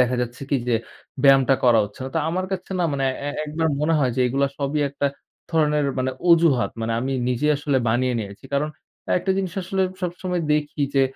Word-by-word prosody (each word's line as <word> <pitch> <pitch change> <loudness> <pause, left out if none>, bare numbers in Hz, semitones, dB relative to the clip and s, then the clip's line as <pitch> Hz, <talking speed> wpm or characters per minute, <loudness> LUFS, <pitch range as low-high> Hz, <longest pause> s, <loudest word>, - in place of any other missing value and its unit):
দেখা 125 0 +3
যাচ্ছে 120 +2 -4
কি 140 - +3
যে 120 - +3 0.5
ব্যায়ামটা 135 -1 +6
করা 120 -2 +6
হচ্ছে 105 - -12
না। - - -4
তো - - +2
আমার 185 +3 -1
কাছে 185 0 -5
না - - +2
মানে 135 -1 0 0.2
এ - - -1 0.2
একবার 160 +2 -1
মনে 160 +2 +2
হয় 130 -4 +1
যে, - - +1
এগুলা 135 +3 +1
সবই 145 +1 -1
একটা 140 +1 -1 0.4
ধরনের 150 -3 +2
মানে 130 0 0 0.2
অজুহাত 165 -7 +4
মানে 115 0 -1
আমি 135 +2 -2 0.2
নিজে 125 +4 0
আসলে 140 -2 0
বানিয়ে 125 +2 +1
নিয়েছি। 100 0 -7
কারণ 145 +2 +1 0.5
একটা 190 - -2
জিনিস 190 -3 -2
আসলে 190 +1 -1 0.2
সবসময় 180 0 -2
দেখি 150 0 -1
যে, 135 - +6
140 Hz, 200 wpm, -23 LUFS, 130-160 Hz, 0.5 s, ব্যায়ামটা